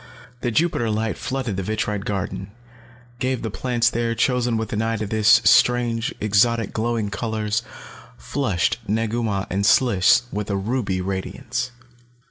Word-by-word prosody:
The 120 - -1
Jupiter 120 -3 +1
light 110 +1 -1
flooded 130 -7 -3
the - - -1
vitrite 105 0 -2
garden, 100 -1 -3 0.7
gave 130 -1 -1
the 110 - -3
plants 120 +1 0
there, 115 -1 0
chosen 120 0 +1
with 110 0 -3
an 105 - 0
eye 115 0 0
to 105 - -3
this, 110 +1 +4
strange, 120 -2 +3
exotic, 110 +1 +2
glowing 110 -2 -1
colors, 110 +1 -1 0.6
flushed 85 - -1
Negu 115 +2 0
Mah 100 -3 -1
and 100 +2 0
Sliss 105 0 +4
with 105 0 -4
a 100 - 0
ruby 100 -2 -1
radiance. 95 +7 -3
110 Hz, 145 wpm, -22 LUFS, 100-120 Hz, 0.7 s, this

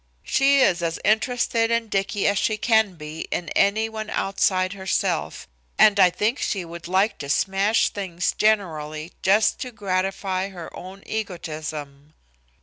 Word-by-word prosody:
She 275 +1 +3
is 175 -8 +3
as 165 -1 -2
interested 225 +1 +1
in 230 -1 0
Dicky 195 0 -1
as 200 0 +2
she 215 - 0
can 220 -4 +2
be 155 0 -7
in 170 -3 -3
any 215 +3 +2
one 220 -1 -6
outside 185 -1 0
herself, 190 -1 -2 0.3
and 205 -1 +5
I 185 -2 +7
think 215 +9 -1
she 190 -4 -2
would 170 0 -9
like 190 +4 +1
to 140 - -6
smash 195 +8 +2
things 180 -4 -2
generally 160 -7 0
just 205 +3 +3
to 255 -3 -5
gratify 190 -2 -2
her 175 -4 -9
own 190 +2 -10
egotism." 155 -7 -6
195 Hz, 145 wpm, -23 LUFS, 170-215 Hz, 0.3 s, I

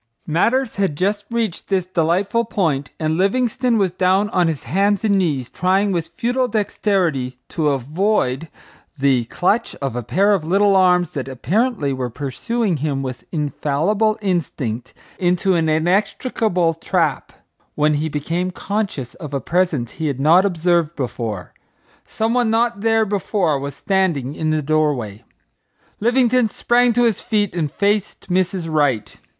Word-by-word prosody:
Matters 230 +10 +1
had 195 -7 0
just 205 +3 0
reached 230 -6 -2
this 190 -2 0
delightful 185 +6 +1
point, 160 -11 -1
and 155 +1 0
Livingstone 240 +4 +1
was 195 -4 +1
down 190 +3 +1
on 180 -2 +2
his 155 -5 -2
hands 200 - +1
and 200 -2 +3
knees 145 -9 0
trying 190 +6 +1
with 170 -3 -1
futile 245 +9 -1
dexterity 185 - 0
to 155 -2 0
avoid 150 - 0 0.5
the 135 -3 +2
clutch 200 - 0
of 135 -4 -4
a 125 - -2
pair 185 - +2
of 190 -6 0
little 195 +4 +3
arms 180 -3 +3
that 135 -3 -4
apparently 160 - 0
were 130 -1 -3
pursuing 160 - -2
him 140 -2 -2
with 130 -2 -6
infallible 165 +8 0
instinct 130 - -2 0.2
into 180 +1 +2
an 165 -2 +1
inextricable 180 +2 +1
trap, 165 -3 -1 0.4
when 150 0 +2
he 150 +2 -1
became 165 +5 -2
conscious 190 - -3
of 150 -5 -7
a - - 0
presence 165 -8 0
he 160 - -3
had 140 -3 -2
not 165 +7 +5
observed 170 -3 +1
before. 115 -7 -4 0.5
Some 225 +1 -1
one 245 -2 +2
not 230 -1 +1
there 225 0 +3
before 195 -6 0
was 140 +1 -5
standing 170 -9 0
in 155 +1 -2
the 155 -1 0
doorway. 135 -8 0 0.8
Livingstone 245 0 +3
sprang 245 +3 +2
to 245 +1 +2
his 230 -4 +1
feet 210 -4 0
and 160 -5 -2
faced 200 +1 -1
Mrs. 185 -1 0
Wright. 145 -8 0
175 Hz, 150 wpm, -20 LUFS, 145-205 Hz, 0.8 s, not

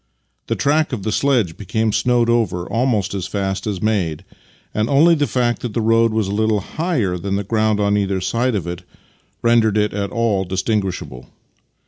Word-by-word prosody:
The - - 0
track 150 0 +1
of 105 -6 -3
the 110 - -1
sledge 115 -10 +1
became 110 +2 -1
snowed 120 +2 +2
over 105 -7 +1
almost 115 -5 0
as 95 -2 -3
fast 95 0 -3
as 100 -3 -3
made, 95 -6 -1 0.5
and 110 +2 0
only 155 +5 +5
the 145 -3 +1
fact 120 -2 0
that 120 -4 -5
the - - +1
road 115 +1 +3
was 110 -2 0
a - - -3
little 110 0 +1
higher 120 - -2
than 100 +2 -2
the 100 - -1
ground 110 0 +1
on 100 0 +2
either 100 -2 0
side 120 +6 0
of 95 -5 -2
it 85 +1 -5 0.6
rendered 115 -3 +3
it 105 0 +1
at 100 -1 -2
all 115 -5 0
distinguishable. 95 - -3
110 Hz, 185 wpm, -19 LUFS, 95-120 Hz, 0.6 s, only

